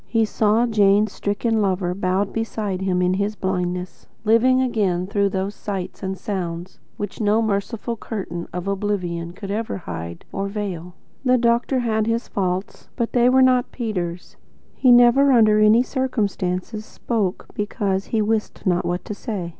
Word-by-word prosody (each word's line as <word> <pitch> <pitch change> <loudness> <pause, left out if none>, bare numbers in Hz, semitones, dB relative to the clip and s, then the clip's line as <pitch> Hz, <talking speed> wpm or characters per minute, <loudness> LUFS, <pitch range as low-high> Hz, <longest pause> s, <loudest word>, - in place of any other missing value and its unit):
He 225 -1 +2
saw 215 +2 +2
Jane's 210 -2 +3
stricken 215 +3 -1
lover, 185 -2 0
bowed 190 +1 -1
beside 215 -4 -3
him 180 -1 +1
in 180 0 +2
his 200 +2 -1
blindness, 180 -2 -3 0.2
living 240 +4 +4
again 205 -8 0
through 200 0 +1
those 190 +1 -2
sights 195 -3 -5
and 190 0 -3
sounds 180 -3 -5 0.2
which 205 +2 -5
no 210 +1 +3
merciful 220 +2 -2
curtain 185 -6 -5
of 180 +2 -5
oblivion 185 -4 -2
could 195 +1 -7
ever 220 +1 -2
hide 85 - -7
or 195 0 -2
veil. 185 -4 -5 0.3
The 255 -1 +4
doctor 240 +2 +2
had 220 -2 0
his 230 +1 -1
faults, 185 0 -3
but 235 -3 -1
they 245 0 +4
were 260 +1 +5
not 255 -1 +3
Peter's. 180 -7 -4 0.4
He 255 - +4
never, 245 +3 +6
under 215 -4 +5
any 215 +3 +5
circumstances, 215 -6 -2
spoke 215 -4 -2
BECAUSE 200 -2 -1
he 220 -2 0
wist 215 0 -2
not 180 -2 +2
what 175 +1 -2
to - - -4
say. 200 -5 -4
205 Hz, 160 wpm, -22 LUFS, 185-225 Hz, 0.4 s, never